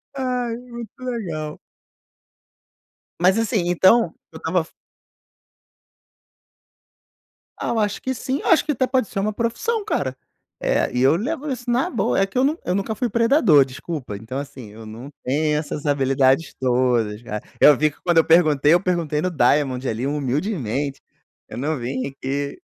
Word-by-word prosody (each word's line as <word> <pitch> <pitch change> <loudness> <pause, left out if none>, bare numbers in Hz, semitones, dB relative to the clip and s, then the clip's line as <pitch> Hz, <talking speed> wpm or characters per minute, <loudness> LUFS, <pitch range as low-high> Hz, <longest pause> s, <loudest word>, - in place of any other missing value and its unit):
Ai, 250 -3 -2
muito 235 -3 -9
legal. 170 -12 -4 1.6
Mas, 185 +4 +4
assim, 215 -6 0
então 185 +2 +4 0.2
eu 160 - -10
estava 165 +3 0
f 160 - -19 2.9
Ah, - - -3
eu 230 - 0
acho 205 -1 -1
que 260 - -2
sim, 260 +3 -3
eu - - -4
acho 335 - +4
que 305 - 0
até 260 -2 0
pode 255 -4 +1
ser 195 - -4
uma 210 +2 -1
profissão, 245 - -1
cara. 130 - -1 0.4
Eh, - - +1
e 125 - +1
eu 135 +4 +5
levo 285 - -3
isso 245 -1 -5
na 240 +2 +1
boa, 230 - 0
é 195 - +4
que 195 - -6
eu 255 - +4
nun 290 +3 +2
eu 180 - -1
nunca 200 +3 -1
fui 240 +3 -2
predador, 230 - +4
desculpa. 135 -3 -6
Então 110 +6 -6
assim, 140 -5 -7
eu 110 +2 -12
não 115 +5 -9
tenho 150 +3 +1
essas 150 0 -4
habilidades 135 +1 +2
todas, 120 -4 +1
cara. 105 -3 -5 0.2
Eu 150 - +8
vi 155 +3 +3
que - - -24
quando 175 -2 +2
eu 165 - +7
perguntei, 155 -3 +4
eu 175 - +4
perguntei 170 -5 -1
no 185 +2 -1
Diamond 135 -2 +2
ali, 115 +2 -2
humildemente. 140 - -2 0.5
Eu - - -8
não 150 +5 -1
vim 130 +2 -3
aqui 140 - -4
160 Hz, 170 wpm, -22 LUFS, -, 2.9 s, Eu